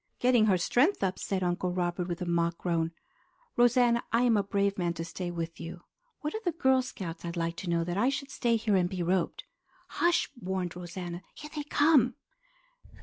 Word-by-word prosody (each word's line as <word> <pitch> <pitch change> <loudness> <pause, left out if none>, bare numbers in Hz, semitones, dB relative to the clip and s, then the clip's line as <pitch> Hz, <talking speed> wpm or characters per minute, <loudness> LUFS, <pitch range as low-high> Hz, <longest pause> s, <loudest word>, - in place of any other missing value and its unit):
"Getting 245 -3 +4
her 190 -3 +4
strength 250 - +2
up," 190 -1 0
said 190 -2 -1
Uncle 180 +1 0
Robert 175 0 -1
with 175 0 -3
a - - -3
mock 170 -1 +1
groan. 165 -2 0 0.6
"Rosanna, 240 -1 +4
I 230 +2 +3
am 240 -2 +4
a 205 - +4
brave 200 0 0
man 170 -1 0
to 165 0 -4
stay 175 +1 -5
with 165 -1 -5
you. 170 +1 -8 0.4
What 300 -1 -3
are 440 - -3
the 350 - 0
Girl 265 -5 +3
Scouts, 185 -9 -7
I'd 170 0 -5
like 165 0 -1
to 180 - -5
know, 170 -1 +2
that 175 +2 -3
I 245 +5 +4
should 275 0 -4
stay 235 -3 +1
here 220 -2 +1
and 180 -2 +2
be 180 -2 -3
roped?" 180 0 0 0.5
"Hush!" 345 0 +2
warned 185 -5 -3
Rosanna. 175 0 -6
"Here 300 - -9
they 300 - -2
come!" 290 -4 +4
185 Hz, 205 wpm, -29 LUFS, 175-245 Hz, 0.6 s, Getting